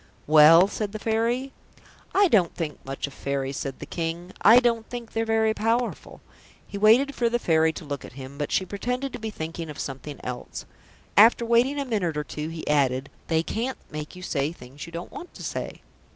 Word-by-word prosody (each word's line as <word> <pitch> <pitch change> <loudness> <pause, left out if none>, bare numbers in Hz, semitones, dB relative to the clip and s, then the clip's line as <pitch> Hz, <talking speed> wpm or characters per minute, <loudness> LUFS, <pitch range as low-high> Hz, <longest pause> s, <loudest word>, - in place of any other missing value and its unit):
"Well?" 155 +4 +8
said 205 0 -4
the - - -3
Fairy. 230 +5 -1 0.6
"I 400 0 +6
don't 195 - +3
think 155 -4 -5
much 135 0 -4
of 140 - -9
Fairies," 135 0 -3
said 135 -2 -4
the - - -8
King. 170 +2 -4
"I 230 +4 +8
don't 235 -2 0
think 240 -2 -7
they're 225 0 -1
very 220 -1 +2
powerful." 230 +3 -2 0.4
He - - -10
waited 225 +8 +5
for 240 -3 +1
the 240 - +1
Fairy 160 -7 +3
to 165 - -8
look 140 -2 -5
at - - -11
him, 135 +2 -10
but 145 - -2
she 190 - +1
pretended 250 +7 -3
to - - -6
be 220 -1 -4
thinking 165 -3 -6
of 150 - -8
something 140 +2 -6
else. 125 -1 -6 0.5
After 230 +3 +6
waiting 240 +5 +3
a 280 - -2
minute 190 - -1
or 150 - -1
two, 150 +1 -5
he 165 -1 -7
added, 135 -2 +1 0.2
"They 160 -1 +1
can't 240 +8 -3
make 150 +3 -6
you 180 - -10
say 145 -4 -1
things 140 0 -11
you - - -10
don't 170 +1 -7
want 355 - -10
to - - -9
say." - - -5
180 Hz, 210 wpm, -25 LUFS, 150-230 Hz, 0.6 s, Well